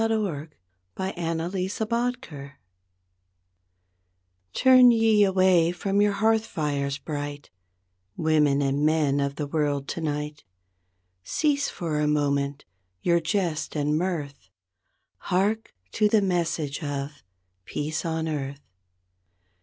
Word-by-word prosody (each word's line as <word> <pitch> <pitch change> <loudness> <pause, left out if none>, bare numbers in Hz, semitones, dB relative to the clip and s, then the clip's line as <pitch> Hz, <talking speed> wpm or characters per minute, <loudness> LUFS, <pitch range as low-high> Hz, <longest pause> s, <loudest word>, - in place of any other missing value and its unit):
CHRISTMAS 180 +1 -2
TIDE 230 - -3 2.0
Turn 255 - +7
ye 225 -3 +4
away 185 -3 +4
from 195 +3 0
your 205 0 +3
hearth 220 +2 +2
fires 140 -6 -2
bright, 145 -1 -6 0.7
Women 150 -3 +2
and 140 +1 0
men 150 -2 +2
of 140 0 -1
the 150 - -3
world, 145 -2 -1
tonight; 150 -2 -4 0.8
Cease 285 - 0
for 160 -4 -3
a 150 - +1
moment, 140 -1 0 0.4
your 170 0 +3
jest 170 -2 -2
and 150 0 +1
mirth, 155 - -3 0.7
Hark 205 +5 0 0.2
to 210 -1 +2
the 210 -1 +3
message 170 -5 -1
of 145 0 -4 0.5
'Teace 155 +2 -3
on 160 -1 -2
Earth''. 140 -2 -4
160 Hz, 100 wpm, -25 LUFS, 145-195 Hz, 2.0 s, Turn